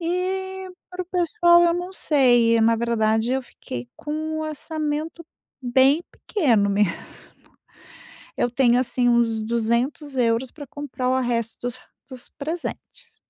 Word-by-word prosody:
E, 375 Hz, +2 st, -3 dB, 0.2 s
para 365 Hz, 0 st, -4 dB
o 355 Hz, -, -15 dB
pessoal 345 Hz, -1 st, +4 dB
eu 340 Hz, 0 st, +3 dB
não 355 Hz, +2 st, -4 dB
sei, 240 Hz, -9 st, +3 dB
na 230 Hz, +1 st, +4 dB
verdade 225 Hz, 0 st, +1 dB
eu 265 Hz, -, -1 dB
fiquei 125 Hz, -, -8 dB
com 315 Hz, +1 st, -4 dB
o 315 Hz, -, -2 dB
orçamento 310 Hz, +1 st, -4 dB, 0.4 s
bem 265 Hz, +5 st, +3 dB
pequeno 230 Hz, -, +1 dB
mesmo. 200 Hz, -3 st, +2 dB, 1.4 s
Eu 245 Hz, -, 0 dB
tenho 245 Hz, 0 st, +3 dB
assim 250 Hz, -1 st, +1 dB
uns 230 Hz, -2 st, +2 dB
200 235 Hz, +6 st, -1 dB
euros 240 Hz, +1 st, +1 dB
pra 290 Hz, -2 st, -10 dB
comprar 265 Hz, -2 st, -4 dB
o 260 Hz, 0 st, +2 dB
resto 235 Hz, -2 st, -2 dB
dos 245 Hz, -1 st, -4 dB, 0.3 s
dos 255 Hz, -2 st, -9 dB
presentes. 320 Hz, +4 st, -6 dB
260 Hz, 135 wpm, -23 LUFS, 235-325 Hz, 1.4 s, pessoal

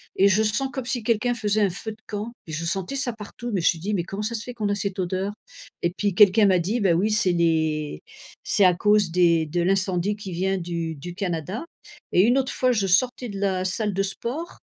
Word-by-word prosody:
et 195 Hz, -, +5 dB
je 205 Hz, +2 st, +3 dB
sens 265 Hz, +5 st, 0 dB
comme 265 Hz, -3 st, -5 dB
si 245 Hz, -2 st, -1 dB
quelqu'un 235 Hz, +2 st, +1 dB
faisait 215 Hz, -2 st, 0 dB
un 200 Hz, -, +3 dB
feu 195 Hz, +5 st, -5 dB
de 215 Hz, -, -12 dB
camp 210 Hz, +3 st, -4 dB, 0.2 s
et -, -, -7 dB
je 160 Hz, -, -3 dB
sentais 190 Hz, +9 st, -2 dB
ça 260 Hz, -3 st, 0 dB
partout, 225 Hz, +2 st, -8 dB
mais 185 Hz, -, 0 dB
je -, -, +2 dB
suis 165 Hz, -, +2 dB
dit: 205 Hz, +5 st, -3 dB
«Mais 175 Hz, -4 st, 0 dB
comment 195 Hz, +3 st, -6 dB
ça 235 Hz, +2 st, -2 dB
se 225 Hz, -, -3 dB
fait 245 Hz, -, -7 dB
qu'on 215 Hz, -3 st, -2 dB
a 205 Hz, -, +1 dB
cette 200 Hz, -1 st, -3 dB
odeur?» 185 Hz, +3 st, -2 dB, 0.5 s
Et 170 Hz, -, +3 dB
puis 205 Hz, -2 st, 0 dB
quelqu'un 205 Hz, +1 st, +6 dB
m'a 185 Hz, -2 st, +4 dB
dit: 205 Hz, +8 st, -1 dB
«Bah 185 Hz, -4 st, +3 dB
oui, 200 Hz, +6 st, +1 dB
c'est 210 Hz, -4 st, +3 dB
les 160 Hz, -, 0 dB, 0.4 s
c'est 200 Hz, -, +3 dB
à 180 Hz, -, +6 dB
cause 205 Hz, -2 st, +3 dB
des 170 Hz, -2 st, +3 dB
de 175 Hz, +3 st, -1 dB
l'incendie 190 Hz, +1 st, +1 dB
qui 200 Hz, -3 st, -8 dB
vient 190 Hz, +2 st, 0 dB
du 170 Hz, -2 st, -4 dB
du 175 Hz, +5 st, -8 dB
Canada». 185 Hz, -, -3 dB, 0.5 s
Et 180 Hz, -, +6 dB
une 240 Hz, +6 st, +4 dB
autre 265 Hz, -1 st, 0 dB
fois, 255 Hz, -1 st, +2 dB
je 210 Hz, -5 st, +1 dB
sortais 245 Hz, +6 st, +1 dB
de 200 Hz, -1 st, -6 dB
la 190 Hz, -2 st, 0 dB
salle 210 Hz, +2 st, 0 dB
de 195 Hz, -, 0 dB
sport, 250 Hz, -, -5 dB
195 Hz, 245 wpm, -24 LUFS, 175-215 Hz, 0.5 s, quelqu'un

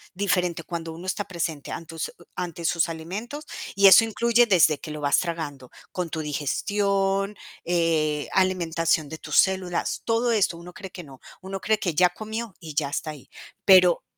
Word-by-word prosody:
diferente 180 Hz, -4 st, 0 dB
cuando 165 Hz, -1 st, -5 dB
uno 170 Hz, +3 st, -9 dB
está 195 Hz, +2 st, -2 dB
presente 165 Hz, -4 st, -4 dB
antus 165 Hz, -1 st, -5 dB, 0.2 s
ante 175 Hz, -1 st, -5 dB
sus 170 Hz, 0 st, +1 dB
alimentos, 210 Hz, -, -6 dB, 0.3 s
y 200 Hz, +1 st, +4 dB
eso 195 Hz, +4 st, +9 dB
incluye 235 Hz, +2 st, +3 dB
desde 160 Hz, -7 st, +4 dB
que 155 Hz, -, -9 dB
lo 150 Hz, 0 st, -6 dB
vas 140 Hz, -1 st, +3 dB
tragando, 150 Hz, -7 st, -5 dB, 0.2 s
con 180 Hz, -2 st, -3 dB
tu 160 Hz, 0 st, -3 dB
digestión, 195 Hz, +6 st, 0 dB, 0.3 s
eh 160 Hz, -3 st, +1 dB
alimentación 165 Hz, -4 st, +1 dB
de 160 Hz, +2 st, -8 dB
tus 150 Hz, -, -2 dB
células, 185 Hz, -2 st, +1 dB
todo 230 Hz, +1 st, +1 dB
esto 200 Hz, -6 st, +1 dB
uno 175 Hz, +1 st, -11 dB
cree 190 Hz, -, -9 dB
que 180 Hz, -, -9 dB
no. 135 Hz, -4 st, -14 dB, 0.2 s
Uno 195 Hz, +1 st, -6 dB
cree 220 Hz, 0 st, +2 dB
que 180 Hz, -5 st, -2 dB
ya 180 Hz, +3 st, +4 dB
comió 220 Hz, +2 st, -6 dB
y 160 Hz, -4 st, -9 dB
ya 145 Hz, -1 st, 0 dB
está 155 Hz, +2 st, -3 dB
ahí. 145 Hz, -4 st, -13 dB, 0.4 s
Pero 180 Hz, -3 st, +6 dB
175 Hz, 175 wpm, -25 LUFS, 160-195 Hz, 0.4 s, eso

